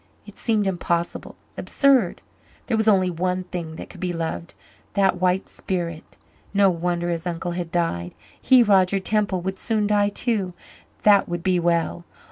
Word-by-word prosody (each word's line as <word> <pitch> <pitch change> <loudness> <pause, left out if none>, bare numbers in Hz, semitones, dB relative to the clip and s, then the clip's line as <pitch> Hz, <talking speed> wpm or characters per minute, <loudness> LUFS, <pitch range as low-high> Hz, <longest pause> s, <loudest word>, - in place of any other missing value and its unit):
It - - -13
seemed 215 -3 0
impossible 175 -2 -2 0.2
absurd. 265 -10 +2 0.4
There 235 - 0
was 220 0 0
only 190 -3 +4
one 180 +2 -1
thing 170 -3 -6
that - - -8
could - - -13
be 180 -1 -2
loved 165 0 -4 0.4
that 195 -3 +2
white 185 +1 +1
spirit. 170 -4 -5 0.4
No 200 -1 +5
wonder 175 0 -1
his 170 +1 -3
uncle 175 0 -3
had 175 -1 -4
died. 90 - -1 0.3
He, 255 -2 +6
Roger 195 -2 +4
Temple, 195 -1 0
would 190 +1 -4
soon 220 -2 0
die 205 -1 +2
too. 205 -4 -2 0.5
That 205 -3 +5
would 175 -1 -3
be 185 -1 +2
well. 170 0 0
185 Hz, 160 wpm, -23 LUFS, 170-200 Hz, 0.5 s, He